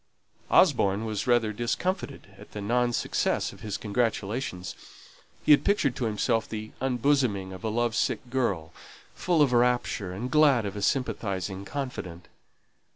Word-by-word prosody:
Osborne 100 +3 +4
was 105 -1 -3
rather 120 -3 +3
discomfited 120 - -2
at - - -15
the 105 - -5
non 120 +4 +1
success - - 0
of - - -15
his 105 -3 -4
congratulations; 105 -2 -2 0.7
he - - +5
had 145 - +7
pictured 150 - +2
to 125 - -2
himself 110 +1 0
the 110 0 -6
unbosoming 125 -7 +1
of 95 - -10
a 110 - -1
love 120 +1 0
sick 125 - -1
girl, 100 -11 -1 0.4
full 170 -4 +2
of 130 -3 +1
rapture, 120 -5 +1
and 115 +7 -5
glad 140 -7 +4
of 100 - -4
a 105 - -4
sympathizing 100 -5 -1
confidant. 100 - -6
115 Hz, 150 wpm, -27 LUFS, 100-125 Hz, 0.7 s, had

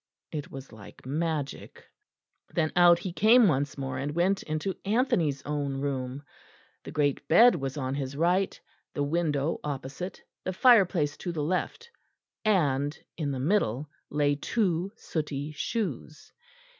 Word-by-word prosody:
It 150 -3 -5
was 135 0 -9
like 110 0 -13
magic. 150 0 -3 0.7
Then 155 -2 0
out 175 -1 +7
he 175 0 -5
came 225 +4 +6
once 140 -3 0
more, 135 -1 -3
and 145 +2 -3
went 185 +3 +2
into 155 +5 -3
Anthony's 200 - +1
own 145 -2 -2
room. 135 -1 -3 0.6
The - - -8
great 145 -1 0
bed 235 +10 +7
was 135 -4 -4
on 130 -2 -2
his 140 0 -4
right, 180 +4 +1 0.4
the 145 - 0
window 150 -1 0
opposite, 145 +5 -5 0.2
the 185 - -2
fireplace 180 - +4
to 175 - -4
the 155 -3 -2
left, 185 - -2 0.5
and 145 -8 +1 0.2
in 155 -4 -2
the 135 -2 -3
middle 145 - 0 0.2
lay 145 -1 +2
two 185 +2 0
sooty 150 -2 -4
shoes. 155 - -4
150 Hz, 140 wpm, -28 LUFS, 140-180 Hz, 0.7 s, out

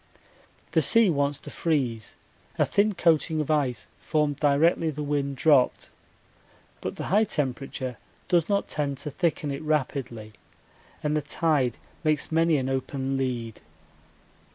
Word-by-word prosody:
The - - +3
sea 230 -5 +5
wants 140 -1 0
to - - -9
freeze 125 - -1 0.4
a - - +3
thin 205 0 +1
coating 160 -1 +2
of 150 0 -1
ice 130 -7 0
formed 150 -2 0
directly 155 +3 +3
the 150 0 -4
wind 140 -1 -1
dropped; 140 -3 +3 0.9
but - - -4
the - - -5
high 210 +2 +5
temperature 130 - -3 0.3
does 170 -1 +2
not 200 -1 +1
tend 140 -2 -2
to 145 +2 -5
thicken 150 -1 -1
it 140 +2 -4
rapidly 135 -8 -2 0.7
and 150 0 0
the 150 - +1
tide 145 -4 0 0.3
makes 155 -1 0
many 165 -1 +3
an 130 -1 -2
open 135 0 -2
lead. 120 -4 -3
145 Hz, 140 wpm, -26 LUFS, 135-160 Hz, 0.9 s, sea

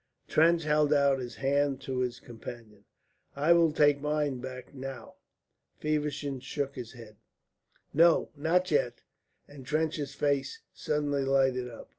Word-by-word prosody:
Trench 165 +1 +4
held 150 -1 +2
out 140 -2 +4
his 120 -2 -6
hand 140 0 +1
to 130 -1 -3
his 125 -1 -2
companion. 115 -3 -11 0.5
"I 150 +5 +4
will 170 -2 +4
take 145 -2 +3
mine 150 -3 -1
back 130 0 -8
now." 135 0 -8 0.6
Feversham 150 -2 -2
shook 140 +1 -4
his 120 -3 -8
head. 110 -4 -13 0.8
"No, 165 +2 +4
not 170 +5 +1
yet," 125 -5 0 0.4
and 145 -2 -12
Trench's 150 0 -2
face 140 -2 -1
suddenly 145 -2 -1
lighted 130 -2 +1
up. 115 - -11
140 Hz, 135 wpm, -29 LUFS, 130-150 Hz, 0.8 s, Trench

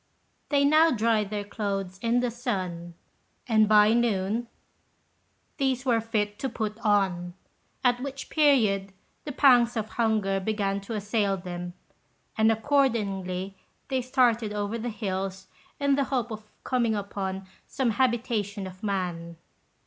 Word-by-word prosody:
They 280 -1 +3
now 310 +3 +6
dried 220 -5 +1
their 205 -1 -3
clothes 195 -3 -4
in 235 +1 +2
the 245 -1 -1
sun, 185 -8 -4 0.5
and 215 -3 +4
by 210 0 +6
noon 230 -1 0 1.1
these 265 -2 0
were 235 -3 +2
fit 210 -2 -2
to 270 - -2
put 220 -2 -4
on; 190 -5 +1 0.5
at 245 -1 +2
which 275 0 -6
period 215 -11 +3 0.3
the 295 - -4
pangs 245 -4 +4
of 220 -1 -2
hunger 215 -4 +1
began 200 -1 -1
to 220 +3 -6
assail 205 -1 0
them, 175 -1 -6 0.6
and 220 0 +4
accordingly 205 -7 0 0.3
they 260 -1 0
started 240 -4 +2
over 210 +2 -2
the 240 +2 -3
hills 195 -3 -4 0.3
in 280 -1 +2
the 275 0 +2
hope 250 -3 -2
of 215 -1 -8
coming 240 -4 +1
upon 195 -1 -4 0.2
some 260 -4 0
habitation 225 -4 0
of 185 0 -10
man. 175 -5 -3
215 Hz, 135 wpm, -27 LUFS, 195-245 Hz, 1.1 s, now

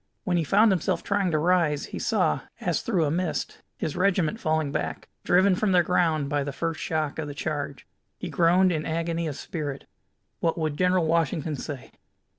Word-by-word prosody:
When 185 -4 0
he 170 - +2
found 210 +7 +4
himself 180 -4 0
trying 200 -2 +1
to 155 - +1
rise, 160 -3 +2
he - - -3
saw, - - +1 0.2
as - - -1
through 190 - +1
a 145 - 0
mist, 175 0 -2 0.2
his 155 - -3
regiment 185 +1 +1
falling 155 -5 0
back, - - -3 0.2
driven 185 +2 +4
from 195 +1 +1
their 180 -1 +5
ground 165 -4 +1
by 145 0 0
the 140 - -4
first 165 +3 -3
shock 155 -2 -2
of 155 - -3
the 145 - -7
charge. 145 -4 -4 0.3
He - - -5
groaned 180 +2 +3
in 155 -3 -1
agony 165 +1 -2
of 145 - -4
spirit. 145 -3 -5 0.5
What 165 0 0
would 155 -3 -1
General 180 +1 +2
Washington 160 -1 0
say? 140 -1 -7
165 Hz, 190 wpm, -26 LUFS, 150-180 Hz, 0.5 s, their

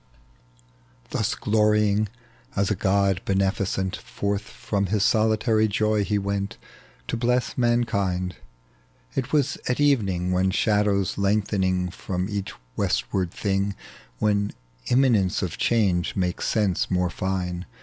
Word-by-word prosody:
Thus - - 0
glorying 105 -1 +2 0.5
as 100 +1 +1
a - - +2
god 95 0 +2
beneficent, 95 -1 0
Forth 100 0 -3
from 100 -1 -3
his 100 +1 +1
solitary 110 0 +3
joy 105 0 +1
he 105 +1 0
went 100 0 -2 0.5
To - - 0
bless 120 +1 0
mankind. 100 -7 0 0.8
It 130 - -2
was 145 -2 +1
at 125 - 0
evening, 100 -11 +2
When 95 +1 +2
shadows 100 -1 +1
lengthen 95 -3 +1
from 90 0 -3
each 100 -2 -3 0.2
westward 95 -3 0
thing, 100 +2 -1 0.4
When 100 - +1 0.3
imminence 120 -9 +3
of 90 - -4
change 100 -6 +1
makes 90 -2 -1
sense 105 -5 +1
more 90 -1 +1
iine. 90 -1 -2
100 Hz, 120 wpm, -25 LUFS, 95-110 Hz, 0.8 s, solitary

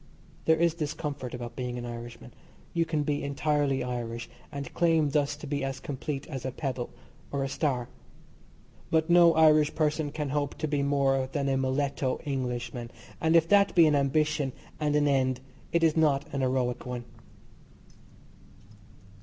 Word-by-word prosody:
There 160 - +5
is 170 0 +3
this 155 -3 -3
comfort 140 -5 -4
about 120 -1 -7
being 125 -1 -3
an 120 - -5
Irishman, 120 0 -8 0.4
you 170 -1 +2
can 155 -2 0
be 145 0 -1
entirely 140 -1 0
Irish, 120 -2 -4 0.2
and 140 -2 -6
claim 165 -4 +3
thus 145 0 +1
to 150 - -9
be 145 -1 -2
as 135 0 -3
complete 140 0 -4
as 135 -5 -6
a 130 - -2
pebble 130 -2 -3 0.4
or 140 -1 -1
a - - -1
star. 130 -4 -1 1.0
But 160 +1 +2
no 170 -1 +7
Irish 155 -1 +5
person 155 -1 0
can 150 -1 -3
hope 145 0 -1
to 155 - -2
be 145 -1 0
more 135 -2 +2
than 140 -1 -1
a 135 - +2
muletto 135 0 0
Englishman, 125 -3 -3 0.3
and 160 +1 +3
if 165 -1 +5
that 200 -1 +4
be 170 -2 +8
an 155 - +4
ambition 145 0 +1 0.3
and 150 -1 +1
an 145 0 +3
end 130 -2 +2 0.3
it 170 0 +2
is 160 -2 +4
not 145 -4 +3
an 140 - -1
heroic 130 -1 0
one. 125 -1 -5
140 Hz, 170 wpm, -28 LUFS, 130-155 Hz, 1.0 s, be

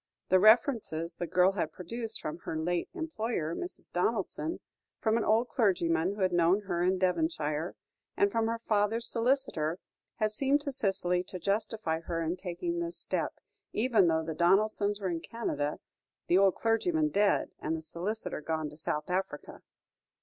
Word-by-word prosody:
The 185 - +6
references 215 - +4
the 175 - -4
girl 180 +3 +4
had 185 -5 -2
produced 225 +5 -5
from 155 +3 -4
her 160 - -4
late 170 +2 -1
employer, 230 - -2
Mrs. 360 - -6
Donaldson, 225 - -1 0.4
from 220 -1 +2
an 230 - +1
old 225 +3 +2
clergyman 180 -4 +2
who 205 - -6
had 185 -1 +2
known 175 +4 +4
her 180 -4 -2
in 185 +1 +2
Devonshire, 180 - 0 0.4
and 200 - +3
from 225 0 +1
her 230 0 -1
father's 225 +1 0
solicitor, 230 - 0 0.4
had 215 -2 0
seemed 275 +6 +2
to 285 -1 -3
Cicely 190 -7 0
to 185 - -7
justify 200 -3 -1
her 165 0 -3
in 165 +2 -1
taking 190 - -3
this 340 0 -3
step, - - -2 0.4
even 220 -5 +3
though 160 -1 +2
the 160 0 -4
Donaldsons 200 +4 +2
were 190 -3 -1
in 165 - -2
Canada, 150 -11 -2 0.5
the 175 - +2
old 195 -2 +4
clergyman 305 +8 +1
dead, 205 -6 +2
and 160 +1 -2
the 160 - -8
solicitor 185 +4 -4
gone 155 -1 -2
to 150 - -13
South 150 -1 -2
Africa. 180 -5 -3
195 Hz, 165 wpm, -30 LUFS, 170-225 Hz, 0.5 s, The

